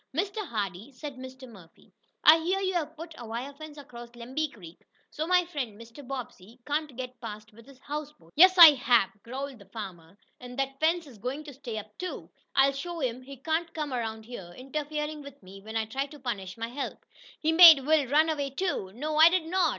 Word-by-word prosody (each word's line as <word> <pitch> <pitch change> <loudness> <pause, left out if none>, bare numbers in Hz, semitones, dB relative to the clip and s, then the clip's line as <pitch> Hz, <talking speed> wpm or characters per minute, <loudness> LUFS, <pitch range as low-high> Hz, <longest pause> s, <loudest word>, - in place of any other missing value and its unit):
"Mr. 395 +4 -1
Hardee," 205 +2 -4
said 280 +1 -8
Mr. 260 0 -10
Murphy, 190 -8 -17 0.3
"I 315 +2 +8
hear 365 +4 0
you 380 -1 -1
have 320 -2 -2
put 330 +1 -9
a 235 - -8
wire 240 +5 -5
fence 305 +1 -11
across 240 -4 -10
Lemby 260 +6 -3
Creek, 175 -6 -13 0.3
so 310 +2 -3
my 360 0 +4
friend, 260 -11 -5
Mr. 230 +5 -12
Bobbsey, 245 -4 -8
can't 295 -2 -2
get 250 -2 -7
past 215 -1 -8
with 230 +3 -17
his 275 -2 -15
houseboat." 290 - -7
"Yes, 370 +4 +7
I 335 -3 +12
have," 240 -7 +3
growled 265 +2 -6
the 200 - -15
farmer, 190 -4 -9 0.2
"and 250 0 -10
that 270 0 -2
fence 330 +2 +2
is 250 -7 -14
going 260 +7 -4
to 295 -2 -10
stay 245 -4 -7
up, 210 0 -8
too! 365 0 -6 0.2
I'll 270 0 +5
show 340 +5 -5
him 255 -3 -2
he 275 +1 -11
can't 325 +5 -2
come 300 -4 -3
around 220 -2 -4
here, 195 -7 -9
interferin' 300 +3 -4
with 280 -5 -13
me 195 +1 -12
when 220 +2 -5
I 220 - 0
try 270 +6 -3
to 295 +1 -13
punish 210 -6 -5
my 230 0 -4
help. 275 +4 -6 0.3
He 315 - +1
made 320 -5 +9
Will 305 -2 +3
run 300 +5 +4
away 285 -3 -1
too." 275 - -2
"No, 305 +4 -3
I 320 +2 +9
did 355 -2 0
not. 355 0 +2
270 Hz, 210 wpm, -28 LUFS, 230-310 Hz, 0.3 s, I